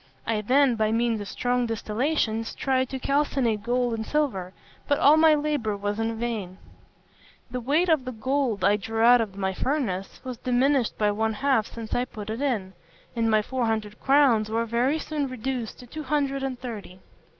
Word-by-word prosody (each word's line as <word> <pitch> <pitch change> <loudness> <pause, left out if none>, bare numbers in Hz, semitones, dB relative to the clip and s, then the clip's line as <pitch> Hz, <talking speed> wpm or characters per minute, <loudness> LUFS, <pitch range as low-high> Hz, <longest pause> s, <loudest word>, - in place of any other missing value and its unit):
I 215 -2 0
then, 260 +4 +4
by 215 0 +1
means 230 -1 +1
of 205 - -6
strong 245 +1 0
distillations, 225 0 -1
tried 260 -1 0
to 270 - -4
calcinate 265 -5 0
gold 245 +2 0
and 220 -1 -2
silver; 220 -10 -1 0.4
but 285 - +2
all 295 0 +6
my 315 -1 +6
labour 290 -9 -1
was 205 +1 -3
in 225 0 -1
vain. 220 -6 -4 0.9
The 250 - -2
weight 295 +9 +1
of 315 -6 +3
the 255 - -3
gold 250 -2 -1
I 205 +2 +4
drew 225 +2 -3
out 240 +1 +7
of 200 -3 -5
my 190 -1 -1
furnace 195 -7 -2
was 255 -2 -6
diminished 255 0 +1
by 210 -1 +2
one 220 +1 0
half 265 -3 +1
since 225 -2 -7
I 245 - +1
put 215 -4 -7
it 225 +4 -4
in, 215 -10 -1 0.4
and 230 -1 +1
my 215 -1 +3
four 250 0 -1
hundred 215 -1 -2
crowns 265 -6 +4
were 230 +1 0
very 240 +6 +1
soon 300 -2 -3
reduced 255 -2 -4
to - - -11
two 310 +6 -7
hundred 280 -1 -1
and 265 -2 -3
thirty. 215 -7 -7
240 Hz, 190 wpm, -26 LUFS, 215-270 Hz, 0.9 s, out